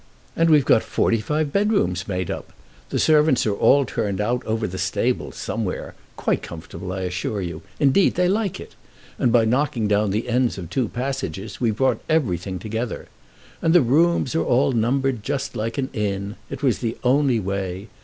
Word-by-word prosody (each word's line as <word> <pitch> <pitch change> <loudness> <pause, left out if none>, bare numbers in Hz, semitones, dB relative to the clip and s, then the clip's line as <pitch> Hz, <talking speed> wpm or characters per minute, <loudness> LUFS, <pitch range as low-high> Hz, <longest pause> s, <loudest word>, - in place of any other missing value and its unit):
And 165 0 +3
we've 150 -4 +5
got 110 - +5
forty 115 - +1
five 150 +4 -1
bedrooms 200 - +1
made 90 -2 -2
up. - - -6 0.4
The - - -2
servants 150 -4 +4
are 105 - +1
all 140 +7 +4
turned 105 -6 -2
out 120 +4 0
over 110 0 0
the 95 -2 -5
stables - - -1
somewhere, - - -4 0.2
quite - - 0
comfortable, 90 +2 -8
I 95 0 -3
assure 95 +3 -2
you. 90 -2 -5 0.2
Indeed 145 +7 +4
they 180 0 +2
like 200 0 0
it. - - -10 0.5
And 120 - +3
by 115 -1 +4
knocking 120 -2 +1
down 105 0 +2
the 105 +5 -1
ends 125 -1 +1
of 90 -2 -7
two 125 0 0
passages 120 -6 -4
we've 115 -3 +1
brought 130 +1 +1
everything 95 - 0
together. 110 +5 -4 0.5
And 165 +1 +3
the 175 - +7
rooms 155 +3 +2
are 165 - +1
all 130 +3 +2
numbered 125 +1 +1
just 135 +2 -3
like 115 +2 -3
an 130 -2 -2
inn. 100 -1 -2
It 140 +1 -7
was 125 -6 +2
the 115 -2 -3
only 130 -1 +3
way. 95 0 -3
120 Hz, 185 wpm, -22 LUFS, 100-140 Hz, 0.5 s, the